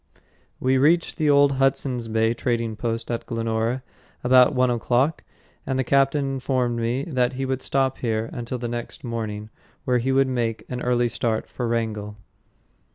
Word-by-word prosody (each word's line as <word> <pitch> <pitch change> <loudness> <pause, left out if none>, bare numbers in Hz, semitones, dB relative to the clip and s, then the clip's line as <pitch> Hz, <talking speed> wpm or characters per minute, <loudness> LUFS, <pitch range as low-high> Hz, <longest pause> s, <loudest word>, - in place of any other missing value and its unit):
We 130 0 +2
reached 165 +5 +3
the 155 -1 +2
old 140 -1 +5
Hudson's 135 -3 +1
Bay 110 +1 +2
trading 115 -2 -1
post 115 +1 -3
at 115 - -3
Glenora 115 +2 -1 0.4
about 125 +2 +5
one 125 -1 +3
o'clock, 125 +6 +1 0.4
and 135 - -2
the 130 - +1
captain 140 +2 +2
informed 130 -3 -1
me 120 +4 -1
that 130 -4 0
he 135 +1 -3
would 130 0 -2
stop 135 -1 0
here 110 -2 -1
until 120 +1 -4
the 120 0 -4
next 120 0 -6
morning, 110 -3 -4 0.3
when 125 -1 +2
he 130 +3 0
would 135 0 +3
make 120 -3 -2
an 125 -1 -4
early 120 -1 +2
start 115 -1 -2
for 120 - -4
Wrangell. 110 -3 -2
125 Hz, 165 wpm, -24 LUFS, 115-130 Hz, 0.4 s, old